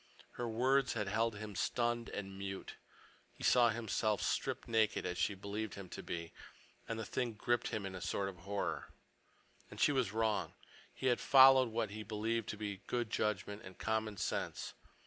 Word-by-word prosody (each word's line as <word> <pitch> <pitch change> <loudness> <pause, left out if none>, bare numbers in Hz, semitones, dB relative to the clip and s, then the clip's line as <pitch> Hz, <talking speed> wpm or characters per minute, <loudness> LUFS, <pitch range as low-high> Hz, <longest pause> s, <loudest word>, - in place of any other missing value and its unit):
Her 120 -1 -3
words 130 +4 +3
had 105 -3 -2
held 110 +1 +1
him 105 -1 -7
stunned 120 +2 0
and 95 -1 -5
mute. 95 0 -5 0.6
He - - -10
saw 120 -2 +6
himself 110 -2 0
stripped - - -1
naked, 110 -2 +2
as 90 -1 -2
she 105 - +1
believed 100 +2 -4
him 100 -3 -8
to - - -6
be, 85 -1 -5 0.5
and 115 - -3
the 115 - -3
thing 125 0 -1
gripped 120 +2 0
him 105 - -2
with 95 -1 -4
a 90 - -6
sort 100 0 -1
of 95 -2 -6
horror. 100 +4 -3 0.8
And - - -10
she - - +5
was 130 -8 +1
wrong. 110 -1 0 0.4
He - - -7
had 125 -2 +3
followed 130 -2 +8
what 110 -2 -1
he 110 +1 -5
believed 110 +2 -2
to 105 - -4
be 100 -2 -4
good 120 -3 -1
judgment 105 0 -1
and 95 -1 -11
common 110 -2 -1
sense. - - -2
110 Hz, 185 wpm, -36 LUFS, 100-115 Hz, 0.8 s, followed